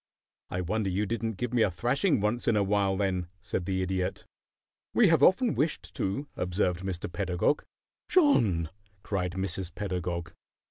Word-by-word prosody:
"I 90 Hz, -, -2 dB
wonder 100 Hz, +3 st, -1 dB
you 100 Hz, +3 st, 0 dB
didn't 115 Hz, +1 st, -2 dB
give 125 Hz, +3 st, -3 dB
me 120 Hz, -, +3 dB
a 105 Hz, -, +4 dB
thrashing 125 Hz, -, +1 dB
once 110 Hz, +4 st, 0 dB
in -, -, +4 dB
a 105 Hz, -, +3 dB
while, 100 Hz, -1 st, +1 dB
then," 95 Hz, -3 st, 0 dB
said 95 Hz, -2 st, -3 dB
the 95 Hz, -1 st, 0 dB
Idiot. 95 Hz, 0 st, -2 dB, 0.7 s
"We 220 Hz, -6 st, +6 dB
have 165 Hz, -4 st, +4 dB
often 220 Hz, -, +5 dB
wished 150 Hz, +1 st, -1 dB
to," 120 Hz, +10 st, -2 dB
observed 90 Hz, -1 st, 0 dB
Mr. 95 Hz, -2 st, -4 dB
Pedagog. 90 Hz, +8 st, 0 dB, 0.5 s
"John!" 110 Hz, -, +3 dB, 0.3 s
cried 90 Hz, -3 st, -2 dB
Mrs. 95 Hz, -1 st, -3 dB
Pedagog. 90 Hz, -4 st, -3 dB
95 Hz, 155 wpm, -29 LUFS, 90-115 Hz, 0.7 s, We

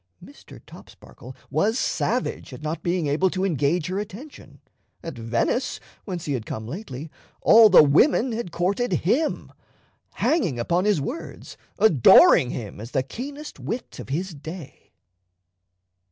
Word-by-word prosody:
Mr. -, -, -15 dB
Topsparkle 130 Hz, +2 st, -14 dB, 0.2 s
was 205 Hz, -, +1 dB
savage 245 Hz, -, -2 dB
at 125 Hz, -, -10 dB
not 155 Hz, +2 st, -4 dB
being 175 Hz, -1 st, -1 dB
able 150 Hz, +6 st, +1 dB
to 185 Hz, +1 st, -2 dB
engage 155 Hz, -1 st, 0 dB
her 185 Hz, +2 st, -3 dB
attention. 215 Hz, +9 st, -10 dB, 0.4 s
At 165 Hz, -, -7 dB
Venice, 115 Hz, -, -1 dB, 0.3 s
whence 180 Hz, -5 st, -5 dB
he 145 Hz, -, -2 dB
had 115 Hz, -5 st, -4 dB
come 110 Hz, -, -5 dB
lately, 150 Hz, -, -7 dB, 0.3 s
all 220 Hz, -1 st, +7 dB
the 185 Hz, -, +8 dB
women 235 Hz, -, +3 dB
had 225 Hz, -5 st, -4 dB
courted 195 Hz, +8 st, -1 dB
him, 285 Hz, -, 0 dB, 0.6 s
hanging 230 Hz, -, 0 dB
upon 170 Hz, +10 st, 0 dB
his 210 Hz, -6 st, +2 dB
words, 250 Hz, -, -7 dB, 0.2 s
adoring 190 Hz, -, +6 dB
him 105 Hz, -6 st, -7 dB
as 115 Hz, -, -8 dB
the 130 Hz, -, -1 dB
keenest 285 Hz, -, -8 dB
wit 240 Hz, -, -6 dB
of -, -, -9 dB
his 175 Hz, +6 st, -3 dB
day. 160 Hz, +1 st, -11 dB
175 Hz, 140 wpm, -23 LUFS, 140-220 Hz, 0.6 s, the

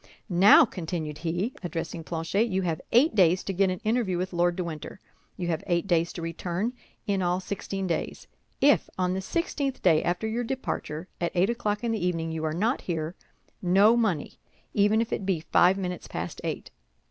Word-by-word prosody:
"Now," 200 Hz, -, +7 dB
continued 160 Hz, -7 st, -5 dB
he, 175 Hz, +9 st, -2 dB
addressing 170 Hz, -2 st, -4 dB
Planchet, 165 Hz, +7 st, 0 dB
"you 190 Hz, -3 st, -1 dB
have 165 Hz, -3 st, -1 dB
eight 265 Hz, +8 st, +5 dB
days 185 Hz, -3 st, +4 dB
to 195 Hz, -, -3 dB
get 190 Hz, +1 st, +2 dB
an 185 Hz, -1 st, -3 dB
interview 220 Hz, -5 st, +1 dB
with 185 Hz, +1 st, -3 dB
Lord 175 Hz, 0 st, +2 dB
de 180 Hz, -, -2 dB
Winter; 165 Hz, +2 st, -7 dB, 0.4 s
you 175 Hz, -2 st, -3 dB
have 160 Hz, -2 st, -1 dB
eight 175 Hz, 0 st, +1 dB
days 170 Hz, -3 st, +1 dB
to 170 Hz, -, -6 dB
return—in 190 Hz, +4 st, -3 dB
all 180 Hz, 0 st, +1 dB
sixteen 195 Hz, 0 st, -4 dB
days. 170 Hz, -, -3 dB, 0.4 s
If, 285 Hz, +1 st, +4 dB
on 180 Hz, 0 st, +1 dB
the 190 Hz, -, -2 dB
sixteenth 280 Hz, -, -2 dB
day 160 Hz, -4 st, +5 dB
after 180 Hz, +5 st, -1 dB
your 225 Hz, +2 st, -1 dB
departure, 225 Hz, -, -4 dB
at 170 Hz, -, 0 dB
eight 185 Hz, +5 st, +3 dB
o'clock 210 Hz, -3 st, -2 dB
in 235 Hz, -, 0 dB
the 220 Hz, -5 st, -2 dB
evening 165 Hz, -2 st, -1 dB
you 160 Hz, 0 st, -4 dB
are 155 Hz, -, 0 dB
not 220 Hz, -, 0 dB
here, 165 Hz, -2 st, -3 dB, 0.5 s
no 195 Hz, +5 st, +5 dB
money—even 210 Hz, +1 st, 0 dB
if 230 Hz, -, -2 dB
it -, -, -2 dB
be 185 Hz, -4 st, 0 dB
but -, -, -26 dB
five 185 Hz, +2 st, +5 dB
minutes 180 Hz, -2 st, -4 dB
past 80 Hz, +1 st, -5 dB
eight." -, -, -4 dB
185 Hz, 190 wpm, -27 LUFS, 170-210 Hz, 0.5 s, Now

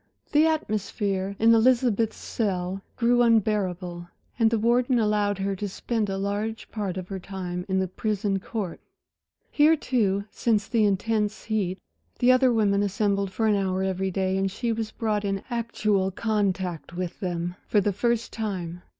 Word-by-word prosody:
The 305 Hz, +2 st, +5 dB
atmosphere 200 Hz, -8 st, -1 dB
in 230 Hz, +1 st, +5 dB
Elizabeth's 230 Hz, -2 st, +3 dB
cell 190 Hz, -3 st, -2 dB
grew 245 Hz, 0 st, +3 dB
unbearable, 190 Hz, -6 st, +1 dB, 0.3 s
and 225 Hz, -1 st, +5 dB
the 230 Hz, -, +1 dB
warden 240 Hz, +3 st, +2 dB
allowed 210 Hz, -2 st, +1 dB
her 195 Hz, 0 st, -1 dB
to 205 Hz, +2 st, -4 dB
spend 215 Hz, +2 st, -2 dB
a 195 Hz, -, -2 dB
large 205 Hz, +3 st, -3 dB
part 200 Hz, -4 st, -3 dB
of 185 Hz, -1 st, -5 dB
her 195 Hz, -1 st, -4 dB
time 180 Hz, -1 st, -5 dB
in 190 Hz, -, +1 dB
the 190 Hz, 0 st, +1 dB
prison 200 Hz, +1 st, -1 dB
court. 200 Hz, -3 st, -5 dB, 0.7 s
Here, 310 Hz, +2 st, +5 dB
too, 205 Hz, -9 st, 0 dB
since 215 Hz, -3 st, +1 dB
the 225 Hz, -3 st, +2 dB
intense 210 Hz, +1 st, 0 dB
heat, 200 Hz, -5 st, -1 dB, 0.4 s
the 245 Hz, +1 st, +5 dB
other 255 Hz, 0 st, +5 dB
women 205 Hz, -3 st, +2 dB
assembled 200 Hz, -1 st, 0 dB
for 220 Hz, +4 st, -1 dB
an 215 Hz, -, +4 dB
hour 190 Hz, -1 st, 0 dB
every 190 Hz, 0 st, -1 dB
day, 190 Hz, 0 st, 0 dB
and 195 Hz, 0 st, +1 dB
she 230 Hz, +5 st, -2 dB
was 220 Hz, -1 st, -3 dB
brought 215 Hz, -2 st, -1 dB
in 195 Hz, -1 st, -2 dB
actual 215 Hz, -5 st, 0 dB
contact 190 Hz, -5 st, -2 dB
with 180 Hz, -1 st, -4 dB
them 175 Hz, -2 st, -2 dB
for 210 Hz, -, +3 dB
the 205 Hz, 0 st, +1 dB
first 235 Hz, +3 st, 0 dB
time. 180 Hz, -6 st, -4 dB
205 Hz, 165 wpm, -26 LUFS, 190-225 Hz, 0.7 s, The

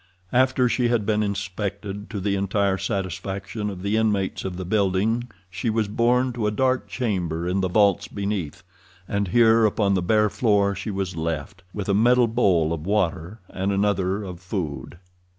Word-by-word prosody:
After 130 Hz, 0 st, +3 dB
she 120 Hz, 0 st, +1 dB
had 120 Hz, -3 st, +1 dB
been 105 Hz, 0 st, +1 dB
inspected 100 Hz, 0 st, -4 dB
to 105 Hz, -, -4 dB
the 100 Hz, +1 st, 0 dB
entire 100 Hz, 0 st, 0 dB
satisfaction 95 Hz, +1 st, -3 dB
of 95 Hz, -2 st, -7 dB
the 100 Hz, +2 st, +1 dB
inmates 105 Hz, -4 st, 0 dB
of 95 Hz, -2 st, -4 dB
the 95 Hz, -, -5 dB
building 105 Hz, +5 st, +1 dB, 0.2 s
she 95 Hz, +6 st, -3 dB
was 110 Hz, -1 st, 0 dB
borne 125 Hz, +4 st, +2 dB
to 115 Hz, -3 st, -1 dB
a -, -, +3 dB
dark 130 Hz, +4 st, 0 dB
chamber 90 Hz, -8 st, -2 dB
in 95 Hz, +2 st, 0 dB
the 95 Hz, -, +1 dB
vaults 100 Hz, 0 st, +3 dB
beneath, 100 Hz, -6 st, -4 dB, 0.4 s
and 100 Hz, -1 st, -1 dB
here 115 Hz, +3 st, +5 dB
upon 105 Hz, -2 st, +2 dB
the 95 Hz, -, +1 dB
bare 105 Hz, +3 st, +2 dB
floor 100 Hz, -4 st, +2 dB
she 100 Hz, +2 st, -5 dB
was 95 Hz, -3 st, -3 dB
left, 80 Hz, +2 st, -4 dB
with 100 Hz, 0 st, -5 dB
a 100 Hz, -, +2 dB
metal 120 Hz, +4 st, +4 dB
bowl 95 Hz, -9 st, +2 dB
of 80 Hz, -2 st, -5 dB
water 95 Hz, 0 st, -1 dB
and 95 Hz, +2 st, -2 dB
another 100 Hz, 0 st, 0 dB
of 90 Hz, -3 st, -7 dB
food. 85 Hz, -5 st, -5 dB
100 Hz, 175 wpm, -24 LUFS, 95-110 Hz, 0.4 s, here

